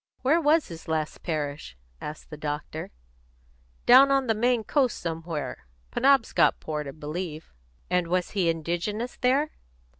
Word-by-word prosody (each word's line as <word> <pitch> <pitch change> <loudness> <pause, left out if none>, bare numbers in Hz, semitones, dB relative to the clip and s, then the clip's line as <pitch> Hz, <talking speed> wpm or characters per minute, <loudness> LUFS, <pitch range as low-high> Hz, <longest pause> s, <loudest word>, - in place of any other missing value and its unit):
"Where 310 +6 +4
was 310 +1 +3
his 165 -1 -10
last 155 -1 -2
parish?" 145 - -4 0.2
asked 150 +1 -8
the - - -5
doctor. 150 +1 -5 1.0
"Down 265 +3 +8
on 275 -1 +3
the 225 - +2
Maine 240 +1 +1
coast 260 -1 +1
somewhere. 165 - -5 0.2
Penobscotport, 225 - +2
I - - -5
believe." 155 - -6 0.3
"And 180 -1 +1
was 180 +1 0
he 185 -5 +1
indigenous 175 +9 -2
there?" 275 +5 +2
175 Hz, 130 wpm, -26 LUFS, 155-250 Hz, 1.0 s, Down